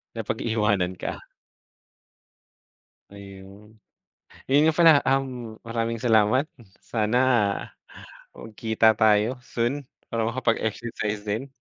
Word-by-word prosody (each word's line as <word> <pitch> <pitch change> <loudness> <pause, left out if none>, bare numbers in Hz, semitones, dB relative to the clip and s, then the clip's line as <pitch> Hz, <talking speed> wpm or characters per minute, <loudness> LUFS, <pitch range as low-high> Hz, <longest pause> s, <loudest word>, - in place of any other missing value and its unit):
Napag-iiwanan 105 -5 -1
ka? - - -5 1.9
Ayun. 100 +2 -14 0.7
Yun 140 +2 +4
nga 160 - +2
pala, 165 -2 +8 0.2
um, 125 -5 -2
maraming 115 0 -2
salamat. 110 +4 +3 0.3
Sana, 110 +1 -2 1.2
magkita 110 0 +1
tayo 110 +3 +3
soon 125 +5 -2 0.2
para 115 -1 -1
makapag-exercise 115 -3 -2
din. 125 +7 -3
110 Hz, 80 wpm, -24 LUFS, 105-120 Hz, 1.9 s, pala